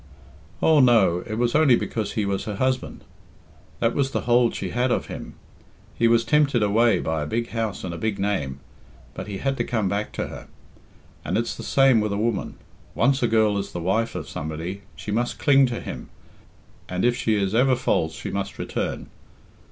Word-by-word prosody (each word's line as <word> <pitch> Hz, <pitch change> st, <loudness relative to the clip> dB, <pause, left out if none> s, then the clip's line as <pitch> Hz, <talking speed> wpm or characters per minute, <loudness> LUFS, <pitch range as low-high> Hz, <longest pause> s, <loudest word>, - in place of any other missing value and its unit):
"Oh, 160 Hz, -2 st, +5 dB
no; 115 Hz, -9 st, +5 dB
it 110 Hz, -, -3 dB
was 120 Hz, +1 st, 0 dB
only 150 Hz, -5 st, +5 dB
because 110 Hz, -2 st, -3 dB
he 105 Hz, -, -1 dB
was 100 Hz, -1 st, -2 dB
her 105 Hz, -, -4 dB
husband. 130 Hz, +4 st, -2 dB, 0.8 s
That 115 Hz, 0 st, +1 dB
was 135 Hz, -2 st, +1 dB
the -, -, -2 dB
hold 120 Hz, 0 st, +3 dB
she -, -, -4 dB
had 125 Hz, +2 st, +1 dB
of -, -, 0 dB
him. -, -, -8 dB, 0.6 s
He 115 Hz, -, +2 dB
was 115 Hz, 0 st, +3 dB
tempted 140 Hz, -3 st, +3 dB
away 110 Hz, +3 st, +3 dB
by 80 Hz, -1 st, -2 dB
a 75 Hz, -, -3 dB
big 115 Hz, +6 st, -2 dB
house 115 Hz, -3 st, -3 dB
and 90 Hz, -, -4 dB
a 85 Hz, -, -6 dB
big 110 Hz, -2 st, -1 dB
name, 70 Hz, -10 st, -2 dB, 0.5 s
but -, -, -7 dB
he 100 Hz, -2 st, -5 dB
had 135 Hz, +5 st, -1 dB
to -, -, 0 dB
come 110 Hz, -6 st, -1 dB
back 100 Hz, +2 st, -2 dB
to -, -, -2 dB
her. -, -, -9 dB, 0.8 s
And -, -, -1 dB
it's 115 Hz, +1 st, -1 dB
the -, -, -8 dB
same 135 Hz, -5 st, +4 dB
with 105 Hz, -1 st, -1 dB
a -, -, -1 dB
woman. 110 Hz, -1 st, -1 dB, 0.4 s
Once 135 Hz, +4 st, +2 dB
a 120 Hz, -, +3 dB
girl 110 Hz, -2 st, +2 dB
is 100 Hz, -, -6 dB
the 90 Hz, -, -3 dB
wife 95 Hz, +6 st, 0 dB
of 80 Hz, -4 st, -5 dB
somebody, 80 Hz, +7 st, -5 dB
she 105 Hz, -, -6 dB
must 120 Hz, +3 st, -1 dB
cling 135 Hz, -2 st, +5 dB
to 120 Hz, -1 st, -4 dB
him, -, -, -7 dB, 0.8 s
and 90 Hz, +3 st, -1 dB
if 120 Hz, 0 st, +3 dB
she 110 Hz, -2 st, 0 dB
is 100 Hz, -1 st, 0 dB
ever 130 Hz, +3 st, +4 dB
false 80 Hz, -9 st, 0 dB
she -, -, -6 dB
must 100 Hz, 0 st, -4 dB
return. -, -, -3 dB
110 Hz, 205 wpm, -24 LUFS, 100-120 Hz, 0.8 s, Oh